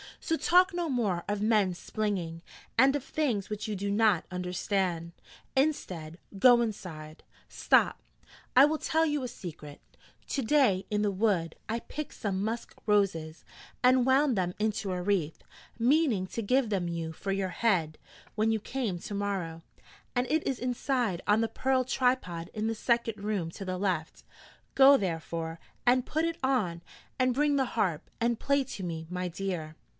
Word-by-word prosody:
So 325 - 0
talk 365 +3 +4
no 345 -2 -1
more 205 -10 0
of 205 0 -1
men 210 -4 +3
splinging, 180 -5 -3 0.4
and 270 +4 +5
of 285 - -2
things 255 -10 -1
which 210 0 -4
you 215 - -2
do 200 +1 -2
not 205 -4 +3
understand. 180 -1 -2 0.4
Instead, 180 - -1 0.2
go 240 +2 +7
inside 160 -8 -5 0.2
stop, - - +2 0.5
I 265 +2 +9
will 310 +1 +1
tell 320 0 +2
you 295 -3 -1
a - - -2
secret: 155 -9 -9 0.5
to 275 - -1
day 230 -7 +3
in 210 -1 0
the 205 - +2
wood 185 -5 0
I 230 +1 -1
picked 305 0 -6
some 195 -2 -2
musk 225 +2 -3
roses 175 -6 +1 0.4
and 250 0 +5
wound 265 0 +4
them 180 -1 -1
into 210 -2 -1
a 180 -1 -2
wreath, 180 -5 -1 0.3
meaning 245 - +3
to 230 - -4
give 250 +2 +2
them 190 -4 0
you 165 -1 -3
for 195 +4 -4
your 195 -1 -1
head 175 -6 0 0.3
when 220 0 +1
you 220 - +1
came 225 -4 -3
to 205 - -7
morrow: 195 -5 -3 0.5
and 245 0 +2
it 315 0 +1
is 265 - 0
inside 245 -6 -1
on 210 +2 +4
the 225 - +1
pearl 260 +3 +1
tripod 250 -10 0
in 215 0 -2
the 225 - -1
second 230 -2 0
room 200 -6 -2
to 195 - -8
the 185 0 -3
left: 180 -5 -2 0.5
go, 275 +1 +8
therefore, 165 -3 -3 0.3
and 250 +1 +3
put 315 +2 0
it 335 0 -2
on, 210 -11 0 0.4
and 255 -1 +2
bring 295 +1 +2
the 270 -1 +2
harp, 185 -9 0
and 235 0 +1
play 280 0 +2
to 245 -7 -7
me, 165 -2 -4
my 180 0 -3
dear.' 175 -3 -4
210 Hz, 170 wpm, -29 LUFS, 180-255 Hz, 0.5 s, I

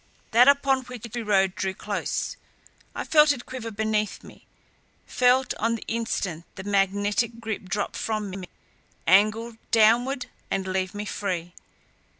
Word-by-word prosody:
That 240 +3 +6
upon 275 -1 +4
which 245 -2 -8
we 240 - -2
rode 195 -3 +2
drew 190 0 -3
close. - - -3 0.6
I - - -3
felt 300 -2 +5
it 255 -4 -4
quiver 250 -3 -6
beneath 215 -1 -1
me; - - -15 0.6
felt 250 +1 +3
on 230 +1 +1
the 230 - -7
instant, 195 -7 -2
the 190 - -7
magnetic 205 +3 +1
grip 220 -4 -4
drop 205 +2 -2
from 215 -3 -2
me, 185 -1 -7 0.6
angle 215 +5 +3
downward 240 +5 +3 0.2
and 195 -1 -1
leave 185 0 -2
me 205 +1 -4
free. 180 -4 -3
215 Hz, 145 wpm, -25 LUFS, 195-235 Hz, 0.6 s, That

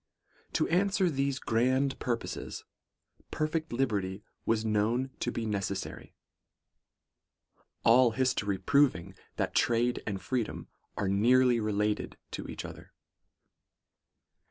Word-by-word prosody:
' - - -34
To - - +2
answer 190 0 +2
these 140 -1 0
grand 130 +4 +1
purposes, 120 -2 -3 0.7
perfect 155 +1 -2
liberty 105 -6 -1 0.2
was 110 -1 +1
known 110 +5 +1
to 120 - -1
be 115 - -3
necessary; 100 -2 -4 1.7
all 120 +2 +6
history 110 -5 0
proving, 100 -9 +2 0.2
that - - -1
trade 120 +1 +2
and 100 -3 -2
freedom 120 +1 -3 0.3
are 100 - 0
nearly 120 +5 +4
related 105 -1 -1
to - - -5
each - - -6
other. - - -11
120 Hz, 110 wpm, -30 LUFS, 105-130 Hz, 1.7 s, all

